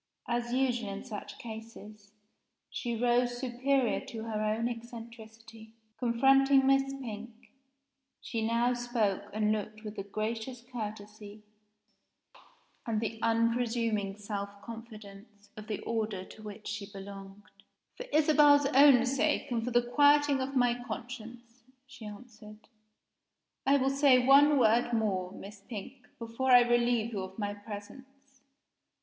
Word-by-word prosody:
As 240 0 -2
usual 245 -4 0
in 195 0 -6
such 215 -5 -8
cases, 220 -2 -10 0.6
she 240 -2 -3
rose 245 +1 +1
superior 255 0 0
to 230 -4 -6
her 220 -2 -3
own 215 +2 0
eccentricity. 230 -1 -10 0.3
Confronting 270 +3 +4
Miss 270 0 +3
Pink, 235 -3 -9 0.7
she 230 -3 -4
now 235 +2 +1
spoke 240 -5 -1
and 215 0 +1
looked 215 0 -4
with 215 0 -8
the 195 - -3
gracious 225 +4 -4
courtesy 210 -1 -7 1.4
and 220 -2 0
the 225 0 -4
unpresuming 230 -3 0
self 200 -1 -6
confidence 215 -2 -12
of 215 0 -10
the 215 -2 -4
order 215 -4 -3
to 215 - -14
which 210 0 -9
she 205 -1 -5
belonged. 195 0 -10 0.5
"For - - -8
Isabel's 295 -2 +5
own 270 -3 +7
sake, 285 +1 0
and 230 -2 0
for 245 - -2
the 240 0 +3
quieting 290 +2 +4
of 270 +1 -4
my 245 -2 +3
conscience," 240 0 -8 0.2
she 265 -5 -11
answered, 215 -1 -13 1.0
"I 280 +1 +5
will 270 0 +1
say 275 -2 +5
one 285 +2 +6
word 240 0 +3
more, 195 -5 0
Miss 200 +1 -11
Pink, 235 +5 -9
before 235 +3 0
I 245 - +9
relieve 240 -1 +1
you 200 - -2
of 190 0 -8
my 205 -2 -2
presence. 260 +7 -12
230 Hz, 130 wpm, -30 LUFS, 215-250 Hz, 1.4 s, I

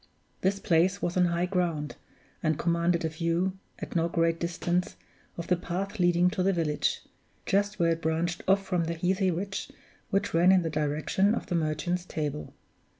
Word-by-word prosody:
This 195 +1 +1
place 185 +1 +2
was 175 -3 -2
on 180 -1 +4
high 170 0 +1
ground, 175 -5 -1 0.5
and 155 -2 +1
commanded 170 0 +1
a - - 0
view, 170 +4 -1 0.2
at - - -7
no 170 0 +2
great 165 -1 +1
distance, 175 +1 -1 0.4
of 170 - -4
the 180 - +2
path 190 +4 -4
leading 175 0 +4
to 200 -2 -2
the 195 +2 +3
village, 155 -4 0 0.4
just 205 +2 +1
where 170 -1 +3
it 165 0 -1
branched 165 +2 -1
off 195 +1 +3
from 175 -3 0
the 170 +1 -2
heathy 185 +3 +1
ridge 195 +3 -3 0.4
which 200 +1 0
ran 175 +3 +5
in 185 -2 +4
the 165 - -2
direction 155 +7 +1
of - - -4
the 180 - -2
Merchant's 165 +3 -1
Table. 150 -4 -4
175 Hz, 180 wpm, -28 LUFS, 165-185 Hz, 0.5 s, ran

